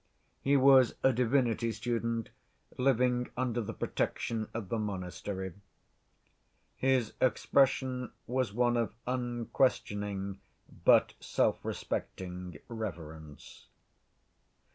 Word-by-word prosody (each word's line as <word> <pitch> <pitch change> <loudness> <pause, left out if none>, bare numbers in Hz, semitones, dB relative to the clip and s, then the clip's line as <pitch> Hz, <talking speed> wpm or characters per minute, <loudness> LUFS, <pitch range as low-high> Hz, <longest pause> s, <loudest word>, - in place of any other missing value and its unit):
He 140 +1 +4
was 130 -2 +6
a 130 - +5
divinity 120 -2 +2
student, 115 0 -2 0.5
living 125 -1 +2
under 120 -2 0
the 105 - -4
protection 110 -2 -2
of 110 -5 -5
the 115 - -1
monastery. 95 -1 -4 1.2
His 130 -4 +1
expression 130 -1 +2
was 130 -2 0
one 120 +2 +2
of 115 -1 -1
unquestioning, 110 -5 -1 0.4
but - - +5
self‐respecting, 90 -3 -2
reverence. 80 -9 -8
115 Hz, 85 wpm, -31 LUFS, 100-125 Hz, 1.2 s, was